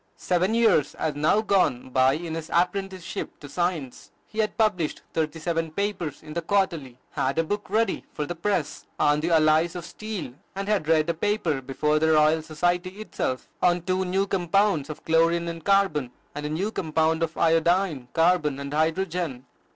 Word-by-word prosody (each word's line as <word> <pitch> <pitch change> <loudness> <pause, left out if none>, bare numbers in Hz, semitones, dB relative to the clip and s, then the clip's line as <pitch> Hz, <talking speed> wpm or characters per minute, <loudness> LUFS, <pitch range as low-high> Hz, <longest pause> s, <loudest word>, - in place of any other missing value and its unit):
Seven 185 +4 +1
years 220 -11 +3
had 155 -2 -1
now 155 +8 +3
gone 185 - +1
by 130 +1 +4
in 160 +2 -4
his 160 -1 -5
apprenticeship 185 0 -2
to 145 - -10
Science. 170 -5 -3 0.2
He 220 - -8
had 215 -1 0
published 205 -9 0
thirty 160 0 -1
seven 165 0 -1
papers 185 -3 -3
in 155 -1 -9
the 170 - -2
"Quarterly," 165 -9 0
had 135 +3 -1
a 165 - +3
book 205 +5 -4
ready 225 +3 +1
for 150 - -3
the 175 - -4
press, 170 -3 -2
on 145 0 +3
the 165 +3 -1
alloys 160 +1 +3
of 175 -1 -5
steel, 210 - -6 0.2
and 195 0 -4
had 205 -7 0
read 160 -1 +3
a - - -4
paper 170 -5 0
before 150 +3 0
the 160 0 +3
Royal 155 +1 +4
Society 175 +4 -1
itself, 130 -11 -3
on 175 -1 +3
two 185 +1 0
new 190 +2 0
compounds 190 -4 +1
of 155 - -8
chlorine 165 +1 +3
and 165 -1 -6
carbon, 195 -10 +2 0.2
and 150 +1 -4
a - - -4
new 185 +8 -1
compound 160 -2 0
of 165 -1 -2
iodine, 165 -3 +2
carbon, 165 -4 +2
and 140 +1 -6
hydrogen. 160 -3 -1
165 Hz, 180 wpm, -25 LUFS, 155-190 Hz, 0.2 s, by